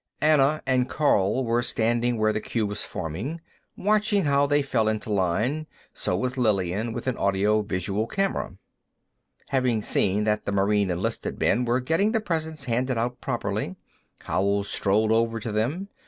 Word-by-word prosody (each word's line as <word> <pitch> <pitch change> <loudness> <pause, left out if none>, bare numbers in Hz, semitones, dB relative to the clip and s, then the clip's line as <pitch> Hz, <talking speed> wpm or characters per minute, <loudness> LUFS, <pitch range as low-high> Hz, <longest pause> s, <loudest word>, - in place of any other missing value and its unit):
Anna 150 0 +3
and 130 -1 +1
Karl 130 -4 +2
were 120 +1 +1
standing 120 +1 0
where 110 0 +2
the 110 - -2
queue 115 -3 -1
was 105 0 -2
forming, 95 - -5 0.4
watching 210 0 +2
how 140 0 +3
they 145 0 +2
fell 110 -5 0
into 110 0 -2
line; 110 - 0 0.3
so 90 - 0
was 130 +5 -2
Lillian, 105 -1 0
with - - -5
an 130 -2 0
audiovisual 100 0 0
camera. 195 - -2 0.9
Having 125 -5 +1
seen 100 +1 +1
that 105 0 0
the - - -1
Marine 100 0 +2
enlisted 90 0 -3
men 125 - +2
were 120 +2 +1
getting 165 - +1
the 225 - +2
presents 160 -6 -3
handed 125 0 -1
out 120 +2 -2
properly, - - -2 0.5
Howell 100 +1 0
strolled 105 +2 +1
over 115 0 +1
to 110 +1 -4
them. 130 - -1
115 Hz, 155 wpm, -25 LUFS, 105-140 Hz, 0.9 s, Anna